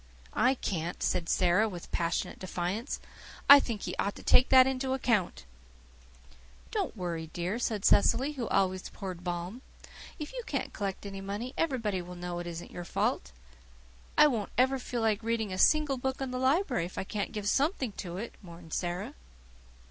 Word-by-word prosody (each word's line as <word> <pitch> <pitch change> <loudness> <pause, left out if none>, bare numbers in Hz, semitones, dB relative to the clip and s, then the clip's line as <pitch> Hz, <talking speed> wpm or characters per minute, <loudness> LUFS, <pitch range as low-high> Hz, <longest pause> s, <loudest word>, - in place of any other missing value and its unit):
"I 260 - +3
can't," 175 -7 -3
said 165 -2 0
Sara, 185 +4 +3
with 175 -3 -9
passionate 170 -1 -1
defiance. 185 +7 -3 0.5
"I 285 0 +12
think 230 -6 -4
He - - -3
ought 200 - 0
to - - -11
take 255 - +5
that 260 -1 +8
into 265 0 -1
account." 215 - 0 1.3
"Don't - - -2
worry, 170 -3 -3
dear," 180 +6 -2
said 215 -4 -1
Cecily, 260 +7 +4
who 255 -6 -4
always 185 -1 +1
poured 185 -3 -7
balm. 175 +6 -4 0.6
"If 300 +4 -6
you - - -4
can't - - -3
collect 200 -1 -4
any 195 -1 -6
money 205 +6 -4
everybody 230 - 0
will 180 +1 -9
know 175 0 -4
it 175 - -5
isn't 170 0 -7
your 175 - -6
fault." 65 - -1 0.9
"I - - +9
won't 230 -9 +1
ever 260 +2 +3
feel 245 -1 -3
like 220 -1 +1
reading 225 -3 -1
a 185 - -4
single 300 0 +4
book 265 +1 -2
in 265 -2 -3
the 255 - -3
library 260 - +2
if 180 - -9
I - - -1
can't 200 +1 -3
give 210 -3 -4
something 275 - +1
to 175 -2 -5
it," 225 +5 -5
mourned 170 -3 -11
Sara. 175 0 -2
205 Hz, 180 wpm, -30 LUFS, 180-255 Hz, 1.3 s, I